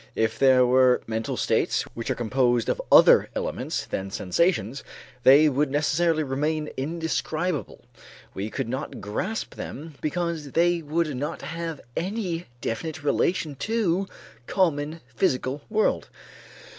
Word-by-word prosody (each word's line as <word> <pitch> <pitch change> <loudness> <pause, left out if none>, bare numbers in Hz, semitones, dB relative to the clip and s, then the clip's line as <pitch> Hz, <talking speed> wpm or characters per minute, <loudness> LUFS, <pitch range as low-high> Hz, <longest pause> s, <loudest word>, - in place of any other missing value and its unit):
If 110 0 0
there 130 -2 +6
were 125 0 +4
mental 110 0 -3
states - - +1
which 115 - -5
are - - +1
composed 120 0 +1
of - - 0
other - - +7
elements - - -3
than 95 0 -4
sensations, 115 - 0 0.4
they 140 +5 +7
would 145 0 +1
necessarily 155 +3 +1
remain 150 +3 -1
indescribable; 160 +2 -3 0.5
we 100 +3 -4
could 135 +1 -3
not 130 +5 -4
grasp 185 - -3
them 155 +3 -7
because 160 -3 -2
they 175 0 +3
would 155 -1 -1
not 145 +5 -4
have 165 -1 -5
any 180 -2 -3
definite 150 +8 -4
relation 155 +1 +1
to 195 - 0 0.4
the - - -8
common 160 -3 0 0.2
physical 135 -4 0
world. 215 0 +1
150 Hz, 130 wpm, -25 LUFS, 130-170 Hz, 0.5 s, other